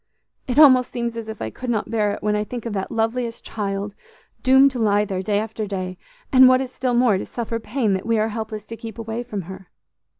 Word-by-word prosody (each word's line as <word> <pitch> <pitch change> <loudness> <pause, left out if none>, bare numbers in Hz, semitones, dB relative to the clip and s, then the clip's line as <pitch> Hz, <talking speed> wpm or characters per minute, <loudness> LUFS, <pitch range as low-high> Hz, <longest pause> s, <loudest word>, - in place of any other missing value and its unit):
It 250 0 -2
almost 260 -5 +7
seems 235 -1 -3
as 225 -1 -6
if 220 - -6
I 110 - -4
could 255 - -7
not 220 -2 -1
bear 210 -2 +1
it - - -8
when 210 0 +1
I 210 - 0
think 240 +2 -7
of 230 - -3
that 195 -1 -3
loveliest 230 +1 -2
child 200 -1 -3 0.5
doomed 265 +1 +6
to 255 - -5
lie 210 -2 +3
there 190 -2 -3
day 205 +1 0
after 215 0 -3
day, 185 -2 -4 0.3
and, 260 0 +9
what 255 0 +5
is 260 -1 -4
still 255 -2 -1
more, 240 -6 +3
to - - -5
suffer 230 -1 -4
pain 225 -2 -1
that 190 +3 -3
we 230 -1 +2
are 215 +1 +1
helpless 220 -1 -5
to 230 - -7
keep 225 0 -9
away 225 +1 -4
from 215 -6 -5
her. 190 +1 -10
225 Hz, 240 wpm, -22 LUFS, 205-240 Hz, 0.5 s, and